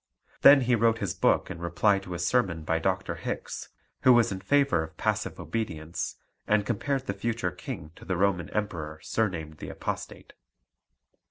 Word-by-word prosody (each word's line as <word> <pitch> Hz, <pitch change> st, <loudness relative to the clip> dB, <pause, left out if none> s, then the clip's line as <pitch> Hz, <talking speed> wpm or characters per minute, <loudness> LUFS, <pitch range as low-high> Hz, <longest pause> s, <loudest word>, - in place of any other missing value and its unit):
Then 140 Hz, 0 st, +9 dB
he 125 Hz, 0 st, +2 dB
wrote 115 Hz, 0 st, +3 dB
his 100 Hz, -6 st, -2 dB
book -, -, +2 dB
in 85 Hz, -, -7 dB
reply 85 Hz, +4 st, +2 dB
to 90 Hz, -2 st, -7 dB
a -, -, -3 dB
sermon 85 Hz, -2 st, +1 dB
by 80 Hz, +1 st, 0 dB
Dr. 95 Hz, +2 st, -1 dB
Hickes, -, -, -5 dB, 0.3 s
who 130 Hz, -, +6 dB
was 120 Hz, -3 st, +4 dB
in 95 Hz, -, -3 dB
favour 140 Hz, -, +3 dB
of 80 Hz, 0 st, -8 dB
passive -, -, -1 dB
obedience, 85 Hz, -8 st, -3 dB, 0.3 s
and 105 Hz, -1 st, +3 dB
compared 130 Hz, +5 st, -1 dB
the 100 Hz, -, -2 dB
future 110 Hz, -2 st, -2 dB
King 80 Hz, -3 st, -7 dB
to -, -, -13 dB
the 95 Hz, -2 st, -2 dB
Roman 90 Hz, -3 st, +1 dB
Emperor 85 Hz, -8 st, -3 dB
surnamed 80 Hz, -8 st, -2 dB
the -, -, -6 dB
Apostate. -, -, -6 dB
95 Hz, 170 wpm, -28 LUFS, 85-115 Hz, 0.3 s, Then